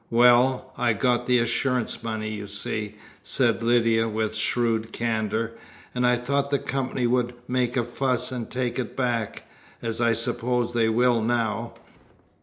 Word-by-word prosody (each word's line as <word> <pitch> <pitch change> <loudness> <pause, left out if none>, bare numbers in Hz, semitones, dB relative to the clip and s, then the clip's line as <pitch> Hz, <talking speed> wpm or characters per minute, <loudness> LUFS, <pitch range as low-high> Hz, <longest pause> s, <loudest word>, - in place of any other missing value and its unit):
"Well, 125 +2 +4
I'd 115 -4 +1
got 125 -1 +1
the 125 -1 +4
assurance 120 +1 0
money, 110 -2 -3
you 105 -1 -6
see," 105 +1 -3 0.3
said 120 -3 +1
Lydia, 115 -1 +3
with 110 0 -1
shrewd 115 0 0
candour, 110 -1 -1 0.4
"and 125 0 +2
I 125 - +4
thought 140 +3 -1
the 140 - +2
company 130 -1 -2
would 120 0 +1
make 125 0 0
a 120 - +2
fuss 125 +1 -1
and 120 -3 -4
take 125 0 -2
it 120 - -5
back 120 -4 -2 0.3
as 115 0 -3
I 115 -1 +4
suppose 120 +1 -1
they 115 -1 +2
will 120 +1 +3
now. 115 0 -1
120 Hz, 155 wpm, -25 LUFS, 115-125 Hz, 0.4 s, Well